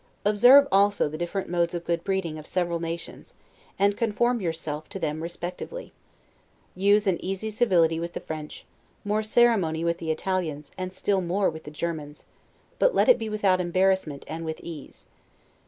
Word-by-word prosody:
Observe 245 Hz, +7 st, +7 dB
also 200 Hz, -1 st, +3 dB
the 150 Hz, -, -6 dB
different 175 Hz, +3 st, -3 dB
modes 170 Hz, 0 st, 0 dB
of 170 Hz, 0 st, -5 dB
good 170 Hz, 0 st, -1 dB
breeding 190 Hz, -5 st, -2 dB
of 155 Hz, -, -11 dB
several 175 Hz, -2 st, -1 dB
nations, 165 Hz, 0 st, -6 dB, 0.4 s
and 200 Hz, +1 st, +3 dB
conform 235 Hz, +2 st, 0 dB
yourself 160 Hz, -3 st, -4 dB
to 195 Hz, -, -6 dB
them 155 Hz, -3 st, -3 dB
respectively. 175 Hz, -, -6 dB, 0.8 s
Use 205 Hz, +3 st, +3 dB
an 185 Hz, -4 st, 0 dB
easy 195 Hz, +3 st, -3 dB
civility 175 Hz, -8 st, +2 dB
with 170 Hz, +1 st, -5 dB
the -, -, -4 dB
French, 155 Hz, -1 st, -7 dB, 0.4 s
more 210 Hz, +1 st, +1 dB
ceremony 215 Hz, -8 st, +2 dB
with 170 Hz, 0 st, 0 dB
the 165 Hz, -, -5 dB
Italians, 160 Hz, -3 st, -2 dB
and 185 Hz, 0 st, -5 dB
still 195 Hz, +1 st, 0 dB
more 185 Hz, +2 st, +1 dB
with 160 Hz, 0 st, -10 dB
the -, -, -7 dB
Germans; 150 Hz, -2 st, -5 dB, 0.5 s
but -, -, +3 dB
let -, -, +4 dB
it -, -, +6 dB
be 220 Hz, -, -4 dB
without 200 Hz, -4 st, +2 dB
embarrassment 185 Hz, -4 st, 0 dB
and 160 Hz, +1 st, -5 dB
with 160 Hz, -1 st, -4 dB
ease. 160 Hz, -5 st, -10 dB
175 Hz, 170 wpm, -26 LUFS, 165-205 Hz, 0.8 s, Observe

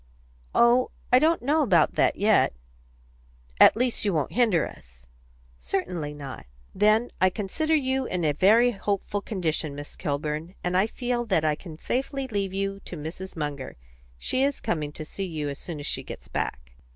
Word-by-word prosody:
"Oh, 240 Hz, +2 st, +5 dB, 0.2 s
I 250 Hz, -, +9 dB
don't 320 Hz, 0 st, +2 dB
know 300 Hz, +5 st, +3 dB
about 175 Hz, -, +4 dB
that -, -, +2 dB
yet." 210 Hz, -, +3 dB, 1.1 s
"At -, -, +8 dB
least 250 Hz, 0 st, 0 dB
you 200 Hz, -4 st, +1 dB
won't 150 Hz, -3 st, 0 dB
hinder 220 Hz, -10 st, +3 dB
us?" -, -, -15 dB, 0.5 s
"Certainly 170 Hz, -, -3 dB
not." 135 Hz, -, -8 dB, 0.3 s
"Then 215 Hz, +4 st, +3 dB
I 185 Hz, -, +6 dB
consider 225 Hz, -, -1 dB
you 265 Hz, -2 st, 0 dB
in 180 Hz, -3 st, -1 dB
a 150 Hz, -, +3 dB
very 220 Hz, +11 st, +5 dB
hopeful 205 Hz, -1 st, -2 dB
condition, 160 Hz, -8 st, -2 dB
Miss 145 Hz, 0 st, -8 dB
Kilburn, 155 Hz, +3 st, -3 dB
and 180 Hz, 0 st, -1 dB
I 190 Hz, +3 st, +4 dB
feel 240 Hz, +1 st, -2 dB
that 185 Hz, -8 st, +1 dB
I 155 Hz, -, +3 dB
can 155 Hz, +1 st, -9 dB
safely 270 Hz, -, -2 dB
leave 200 Hz, -5 st, -2 dB
you 195 Hz, +1 st, -2 dB
to 180 Hz, -, -9 dB
Mrs. 165 Hz, +5 st, -7 dB
Munger. 145 Hz, -4 st, -4 dB, 0.4 s
She 255 Hz, -, -1 dB
is 280 Hz, 0 st, +1 dB
coming 150 Hz, -3 st, -2 dB
to 155 Hz, -, -7 dB
see 195 Hz, +5 st, -5 dB
you 155 Hz, -5 st, -3 dB
as 140 Hz, -, -6 dB
soon 165 Hz, -4 st, -6 dB
as 145 Hz, -, -6 dB
she -, -, -1 dB
gets -, -, -9 dB
back." 60 Hz, 0 st, -4 dB
190 Hz, 175 wpm, -26 LUFS, 155-235 Hz, 1.1 s, I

